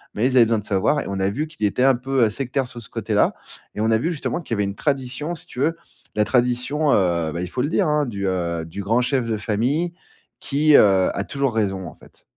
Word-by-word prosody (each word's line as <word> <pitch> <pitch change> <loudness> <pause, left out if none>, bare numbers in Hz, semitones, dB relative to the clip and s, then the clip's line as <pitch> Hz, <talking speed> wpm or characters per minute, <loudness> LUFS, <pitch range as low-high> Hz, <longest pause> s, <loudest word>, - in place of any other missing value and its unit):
mais 110 - +1
ils 130 - -1
avaient 120 -2 +7
besoin 115 -1 +1
de 105 - -10
savoir 100 +9 +1
et - - -7
on 100 -1 -3
a 95 +1 +1
vu 150 +10 -3
qu'il 155 -9 -4
était 125 +5 0
un 135 -1 +5
peu, 130 0 +1
heu, 110 - +1
sectaire, 135 +2 -2
sur 120 -1 -9
ce 105 - -14
côté-là - - 0 0.4
et - - -5
on 110 +1 +2
a 110 - +4
vu 165 +10 -1
justement 170 +2 -3
qu'il 115 - -3
y - - -5
avait 105 - +1
une 100 - -4
tradition 140 +5 -2
si - - -11
tu 125 - -9
veux, 165 +4 +1 0.4
la 105 - +2
tradition, 125 +5 +1
heu, 85 -4 +2
ben 85 - -4
il 90 - -3
faut 125 - -2
le 145 - 0
dire, 185 -1 +1
hein, 150 -1 +2
du, 100 -4 -3
heu, 85 -3 -2
du 90 +5 -7
grand 115 +5 +1
chef 130 -1 0
de 110 -2 -1
famille 125 +12 -1 0.5
qui, 150 +1 +3
heu, 95 -5 +5
a 100 - -1
toujours 140 -1 -2
raison 95 -4 -1
en - - -9
fait. - - -20
120 Hz, 265 wpm, -22 LUFS, 100-140 Hz, 0.5 s, avaient